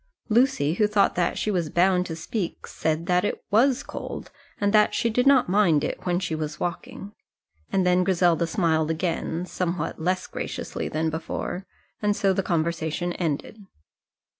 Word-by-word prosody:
Lucy, 220 - +3
who 210 +4 +2
thought 205 -1 +3
that 175 -1 0
she 215 - 0
was 175 -5 -1
bound 180 +2 +2
to 165 - -4
speak, 175 +3 -4
said 160 +1 -2
that 180 0 +2
it 205 - -2
was 255 +6 +3
cold, - - -7 0.3
but 205 0 +2
that 210 0 +4
she 230 - +1
did 250 +4 +2
not 270 -3 +5
mind 175 -6 +3
it 150 - -4
when 175 0 +2
she 180 -3 -3
was 155 -1 -4
walking. 185 +3 -5 0.6
And 190 -1 +2
then 180 0 +4
Griselda 175 -3 +2
smiled 160 -5 +1
again, 165 +1 -2
somewhat 175 -3 -3
less 185 +3 0
graciously - - -5
than 160 +1 -1
before, 170 +3 -4 0.3
and 205 -1 +2
so 195 -1 +2
the 195 - +1
conversation 170 0 -1
ended. 170 +6 -3
180 Hz, 165 wpm, -25 LUFS, 165-205 Hz, 0.6 s, not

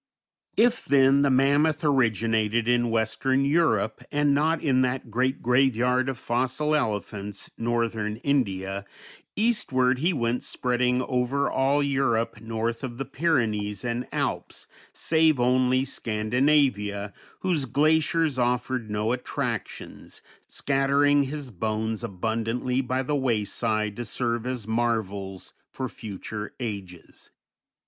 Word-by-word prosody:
If, 240 +1 +3
then, 135 0 +4
the 140 - +3
mammoth 145 +4 +3
originated 115 -4 +1
in 120 -1 +2
western 130 +4 +1
Europe, 140 -9 +1
and 145 -1 +2
not 155 +3 +2
in 130 -4 +2
that 125 -2 -2
great 130 +4 0
graveyard 125 0 +2
of 135 - -4
fossil 130 +6 -1
elephants, 105 - -3
northern 115 -2 -1
India, 100 -8 0 0.5
eastward 130 - +1
he 170 +6 +2
went 120 -5 -1
spreading 125 0 0
over 130 +2 0
all 140 +2 +2
Europe 130 -6 0
north 115 +2 -3
of 120 -2 -5
the 135 - -3
Pyrenees 115 - -1
and 120 +1 -2
Alps, - - -3 0.3
save 160 -3 +2
only 130 +1 +2
Scandinavia, 110 -3 0 0.3
whose 170 -7 0
glaciers 155 +1 +2
offered 125 -1 -1
no 105 +2 -1
attractions, 125 0 -5 0.2
scattering 140 +1 +2
his 140 -1 -6
bones 110 +2 -2
abundantly 115 +5 -1
by 130 +1 -1
the 145 +3 -1
wayside 110 -4 0
to 120 - -4
serve 120 +1 -2
as 125 -5 -4
marvels 105 -5 -2 0.2
for 130 - -4
future 105 -1 -7
ages. 100 -7 -7
125 Hz, 115 wpm, -26 LUFS, 110-140 Hz, 0.5 s, then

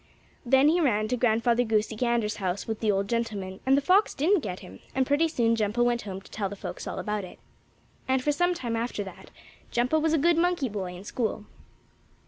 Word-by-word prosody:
Then 265 +3 +4
he 340 +3 +3
ran 215 -8 +2
to 250 - +1
Grandfather 235 0 +2
Goosey 220 -1 0
Gander's 230 -2 0
house 190 0 -2
with 220 -1 -4
the 215 -2 +2
old 195 0 0
gentleman, 205 -5 -3
and 270 +1 +5
the - - +2
fox 380 +6 +3
didn't 350 +8 +3
get 190 - -5
him, - - -12 0.2
and 265 0 +2
pretty 290 +5 +2
soon 235 -7 +1
Jumpo 220 +2 +1
went 240 -1 +1
home 195 -2 -6
to - - -18
tell 200 -3 -2
the 205 - -7
folks - - -7
all - - -4
about 210 -1 -2
it. 180 - -10 0.7
And 260 0 +1
for 295 - +2
some 355 +4 +1
time 240 -8 -3
after 230 -2 -2
that 190 - -11 0.4
Jumpo 250 +6 +1
was 320 0 +1
a - - +4
good 335 +3 +3
monkey 345 -6 +1
boy 190 -4 -5
in 180 - -10
school. 215 -1 -3
235 Hz, 220 wpm, -27 LUFS, 210-275 Hz, 0.7 s, and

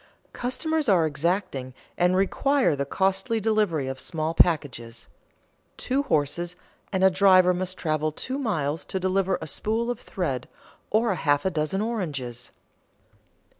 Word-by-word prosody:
Customers 300 +3 -1
are 175 -5 +4
exacting 150 -4 -2 0.2
and 180 +1 +2
require 250 - +2
the 140 0 -3
costly 195 - 0
delivery 210 -10 +1
of 135 0 -5
small 160 0 -2
packages; 125 -9 +1 0.7
two 270 +2 0
horses 170 - -1 0.4
and 190 -1 0
a 190 - +6
driver 185 -1 +5
must 185 +1 -3
travel 155 -1 0
two 260 - -4
miles 160 - -1
to 190 - -4
deliver 190 +1 +1
a - - -6
spool 225 - -1
of 245 - -5
thread 135 -10 -3 0.4
or 220 +1 +2
a - - 0
half 145 -2 +2
dozen 155 +5 -1
oranges. 145 - -3
180 Hz, 135 wpm, -25 LUFS, 150-210 Hz, 0.7 s, a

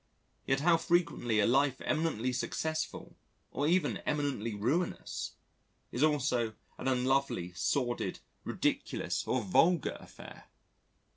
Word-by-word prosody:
Yet 135 +1 +2
how 165 +1 +5
frequently 165 -11 +1
a 105 - +4
life 135 +2 +3
eminently 140 -6 0
successful 155 +5 -3 0.4
or 145 +3 0
even 170 -2 +2
eminently 140 -7 -2
ruinous 140 - -1 0.6
is 120 - -3
also 130 -7 +2 0.2
an 130 - -3
unlovely, 130 -8 +1
sordid, 120 +5 -1 0.3
ridiculous - - -1
or 130 -2 +1
vulgar 160 - +3
affair! - - -12
135 Hz, 110 wpm, -32 LUFS, 120-155 Hz, 0.6 s, how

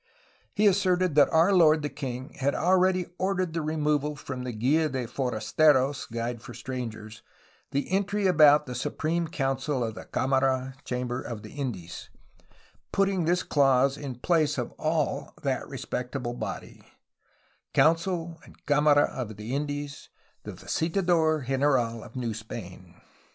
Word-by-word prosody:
He 210 - +2
asserted 185 -3 +3
that 145 0 +5
our 165 +5 +4
lord 160 -4 +5
the - - 0
king 130 -2 -6
had 140 +1 +1
already 185 +2 +3
ordered 185 -3 0
the 165 - -1
removal 150 -1 0
from 130 -2 -6
the 125 - -4
Gma 140 +8 +1
de 130 -3 -3
forasteros 130 +3 +1
(Guide 115 0 -3
for 120 -2 -10
strangers) 115 -4 -6 0.5
[the 140 +1 -1
entry 200 +1 0
about] 150 -4 +6
the 125 - -6
Supreme 160 +7 -2
Council 135 -3 -1
of 110 -1 -3
the - - -9
Camara 130 0 0
(Chamber) 125 0 -3
of 110 -3 -7
the - - -10
Indies, 115 - -6 0.8
put 195 - +3
ting 190 -4 0
this 175 +2 +1
clause 135 -1 +3
in 140 -3 -6
the 120 - -17
place 155 -4 +2
of 120 - -3
all 155 -1 -1
that - - -1
respectable 125 -1 -4
body: 120 - -6 0.9
^Council 165 0 +1
and - - -16
Camara 145 0 +4
of 110 -5 -4
the 110 +4 -5
Indies 145 0 -4 0.2
— - - -39
the - - -6
visitador 160 -3 0
general 130 -4 +1
of - - -13
New 120 -3 -2
Spain.' 95 -5 -9
145 Hz, 150 wpm, -27 LUFS, 125-160 Hz, 0.9 s, about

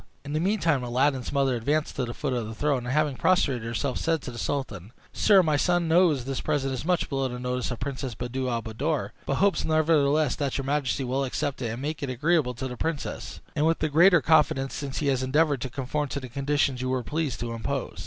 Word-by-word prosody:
In 145 - -5
the 155 - +1
meantime, 170 -7 +1
Aladdin's 130 +1 0
mother 135 -2 +2
advanced 145 +6 -1
to 130 - -1
the 120 - -6
foot 140 -4 -2
of 120 -3 -2
the 110 - -7
throne, 140 -2 0
and - - -2
having 150 -1 +1
prostrated 140 -7 +2
herself, 120 +4 -2
said 165 -3 0
to - - -5
the 120 - -8
sultan, 115 -8 -4 0.2
"Sire, 200 -3 +5
my 155 -3 +2
son 175 +2 +2
knows 160 -6 +3
this 135 0 -3
present 140 -3 -1
is 130 - -4
much 175 +1 +1
below 135 -2 -1
the 125 -1 -5
notice 125 0 -2
of 120 - -5
Princess 135 -2 -4
Buddir 125 +2 -3
al 115 -2 -2
Buddoor; 135 +8 -2 0.2
but 140 - +1
hopes, 195 -2 +2
nevertheless, 155 -2 +2
that 140 -3 -1
your 135 - -3
majesty 140 -1 0
will 130 +2 -1
accept 135 +1 -2
of 120 - -1
it, 110 - -3
and 125 +4 -6
make 155 +1 -3
it 140 - -3
agreeable 130 0 +1
to 130 +3 -4
the 125 - -6
princess, 160 -3 -4
and 155 +1 +2
with 165 - +2
the 155 - -1
greater 170 +3 +6
confidence 150 -4 +3
since 135 -1 -5
he 150 - -1
has 130 -2 +1
endeavored 145 +1 +2
to 130 - -3
conform 140 +3 -2
to 140 - -4
the 130 -2 -8
conditions 140 0 0
you 130 - -2
were 130 -1 0
pleased 155 -2 -2
to 115 0 -3
impose." 115 -2 -4
140 Hz, 240 wpm, -26 LUFS, 125-155 Hz, 0.2 s, greater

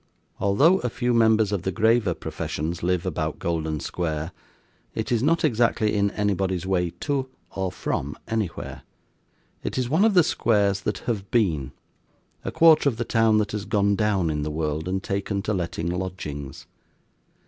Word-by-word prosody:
Although 145 - +4
a 125 - -2
few 120 +1 -1
members 110 -2 +4
of 100 -3 -1
the 95 - -2
graver 110 -3 +2
professions 85 +3 -4
live 90 +1 0
about 80 -3 -2
Golden 80 -2 -2
Square, 80 0 -3 0.6
it - - -3
is 120 -2 +2
not 160 +4 +2
exactly 115 -4 +2
in 100 -1 +2
anybody's 95 -3 -1
way 90 -2 +1
to 135 -2 -1 0.3
or 95 -1 -1
from 75 -4 -3
anywhere. 110 -6 -3 0.8
It - - -4
is 125 -2 0
one 165 +6 +4
of 220 -2 +4
the 180 - +7
squares 100 -9 +1
that 105 - -3
have 100 -5 -2
been; 80 - +1 0.7
a - - -3
quarter 160 -3 +6
of 115 - -5
the 120 - -2
town 115 -1 +3
that 105 -2 0
has 105 -1 -4
gone 100 -1 +2
down 100 -6 +1
in 75 -1 -2
the 75 - -2
world, 75 +1 -2
and 95 +1 -2
taken 100 0 -2
to 110 - -1
letting 85 -2 -2
lodgings. 90 -7 -5
100 Hz, 170 wpm, -25 LUFS, 85-115 Hz, 0.8 s, the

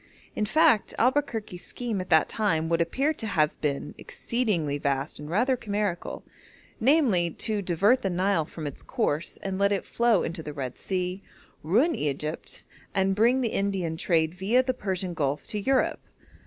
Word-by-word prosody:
In 210 - 0
fact, 310 -4 +3
Albuquerque's 240 -8 0
scheme 230 -6 -3
at 185 - -8
that 160 -2 +5
time 165 -7 0
would 170 0 +2
appear 270 - +1
to 225 -7 -5
have 155 -7 +1
been 145 -1 -2
exceedingly 180 - -1
vast 140 0 -1
and 150 0 -8
rather 245 +9 +2
chimerical 205 -6 -3 0.6
namely, 230 - +3
to 210 +5 -1
divert 200 +8 +3
the 195 - -1
Nile 185 -1 +1
from 155 0 -8
its 145 - -6
course 155 +4 -1
and 195 -1 -3
let 200 0 +3
it 200 - -1
flow 235 -5 +2
into 170 0 -4
the 150 -1 -7
Red 130 -3 -5
Sea, 185 0 -2 0.4
ruin 235 - +3
Egypt, 150 - -4 0.3
and 195 0 +2
bring 235 +6 +3
the 235 - +1
India 195 -6 -1
trade 160 -1 +1
viâ 220 +8 +2
the 255 - +1
Persian 190 -6 -3
Gulf 145 -2 -1
to 210 - -3
Europe. 265 +6 +1
190 Hz, 170 wpm, -27 LUFS, 160-225 Hz, 0.6 s, that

